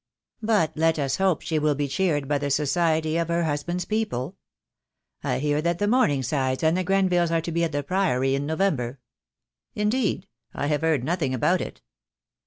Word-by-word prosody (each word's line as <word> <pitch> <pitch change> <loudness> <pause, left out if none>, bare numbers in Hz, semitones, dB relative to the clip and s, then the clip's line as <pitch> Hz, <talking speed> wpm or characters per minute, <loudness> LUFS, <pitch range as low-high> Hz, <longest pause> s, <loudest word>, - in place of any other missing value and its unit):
"But 210 -8 +2
let 160 +1 +2
us 135 -2 -1
hope 190 -4 +1
she 160 -2 0
will 150 -1 +1
be 145 0 -1
cheered 145 -2 0
by 145 0 +1
the 145 0 -2
society 155 +2 +1
of 170 -1 0
her 170 0 0
husband's 165 +4 -2
people. 205 - -2 0.9
I - - 0
hear 150 +2 0
that 170 +1 0
the 205 - 0
Morningsides 140 - +1
and 160 +1 +3
the 185 - 0
Grenvilles 180 -2 +2
are 165 0 +1
to 170 - -5
be 170 +1 0
at 165 - 0
the 145 0 -2
Priory 135 -7 +1
in 140 +1 -1
November." 150 -7 -1 0.8
"Indeed! 210 -2 0 0.3
I - - -2
have 150 +1 0
heard 160 -6 +1
nothing 150 -3 -1
about 120 - +2
it." - - -7
160 Hz, 185 wpm, -25 LUFS, 145-180 Hz, 0.9 s, and